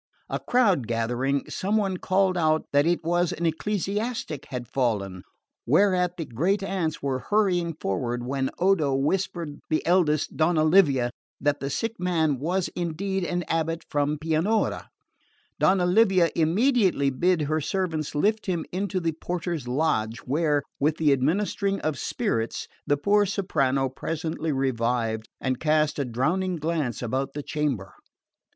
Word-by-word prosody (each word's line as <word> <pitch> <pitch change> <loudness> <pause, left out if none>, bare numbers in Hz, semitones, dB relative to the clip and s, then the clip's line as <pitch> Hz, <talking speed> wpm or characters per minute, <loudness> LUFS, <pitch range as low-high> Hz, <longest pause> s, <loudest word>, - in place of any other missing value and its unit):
A - - -2
crowd 200 - +2
gathering, 120 +4 -1
some 205 +3 -1
one 195 -3 0
called 190 0 +1
out 155 -2 +2
that 145 +2 +4
it 175 -1 +1
was 175 +1 +1
an 170 - -3
ecclesiastic 200 - -2
had 125 -3 -5
fallen; 105 -8 -1 0.5
whereat 180 - +3
the 165 - -3
great 180 - 0
aunts 180 -7 -2
were 135 -2 0
hurrying 180 -6 +2
forward 120 +6 -2
when 135 +1 -1
Odo 175 -7 +2
whispered 160 +1 -1
the 155 - 0
eldest, 165 -4 +2
Donna 155 0 +2
Livia, 145 -8 +4 0.3
that 145 0 +1
the 140 - -3
sick 225 +9 -3
man 160 -6 +1
was 175 +5 0
indeed 185 +3 -2
an 175 0 -1
abate 165 0 -1
from 145 +1 +1
Pianura. 165 +8 0 0.7
Donna 185 -1 +3
Livia 185 -3 +4
immediately 185 - +2
bid 175 +4 +1
her 155 +2 0
servants 160 -4 -2
lift 215 +9 +1
him 175 -4 -1
into 195 +1 -1
the 165 -2 0
porter's 170 -3 -4
lodge, 125 -5 0
where, 145 +1 +1 0.2
with 150 +2 +1
the 155 -3 +3
administering 195 +8 0
of 150 -4 -2
spirits, 115 0 -2 0.2
the 145 - +3
poor 205 +6 +3
soprano 140 -9 +1
presently 160 +4 -3
revived 115 -4 -1
and 130 -1 -1
cast 155 -1 +1
a 140 - 0
drowning 175 +10 0
glance 155 -7 -2
about 130 +3 -2
the 145 - -4
chamber. 135 -12 -2
160 Hz, 145 wpm, -26 LUFS, 135-185 Hz, 0.7 s, that